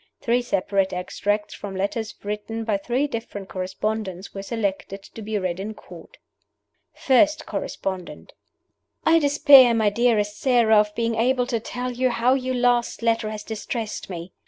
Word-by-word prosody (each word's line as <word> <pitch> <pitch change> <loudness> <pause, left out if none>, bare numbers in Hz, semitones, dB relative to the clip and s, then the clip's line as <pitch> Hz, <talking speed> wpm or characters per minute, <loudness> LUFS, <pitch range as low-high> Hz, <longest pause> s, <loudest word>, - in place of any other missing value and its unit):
Three 240 +1 +1
separate 195 -4 0
extracts 205 +3 -2
from 195 -2 -7
letters 205 +3 -3
written 210 +2 -4
by 215 -2 0
three 245 +7 -1
different 225 -7 -6
correspondents 190 0 -4
were 195 - -5
selected 200 -2 -3
to 225 - -11
be 215 0 -3
read 185 -2 -2
in 215 +3 -5
Court. - - -14 0.8
FIRST 305 +4 +3
CORRESPONDENT: 190 -2 -5 0.7
"I 330 +1 +5
despair, 285 -4 +7
my 215 -2 +2
dearest 210 -2 +1
Sara, 235 -4 +4
of 210 0 0
being 230 0 0
able 245 +2 +1
to 235 -2 -1
tell 250 +3 -4
you 255 +1 +1
how 240 +1 +2
your 255 -1 -1
last 245 -1 +1
letter 230 -2 +1
has 215 -1 -6
distressed 220 0 -5
me. 175 -1 -7
220 Hz, 155 wpm, -23 LUFS, 200-245 Hz, 0.8 s, despair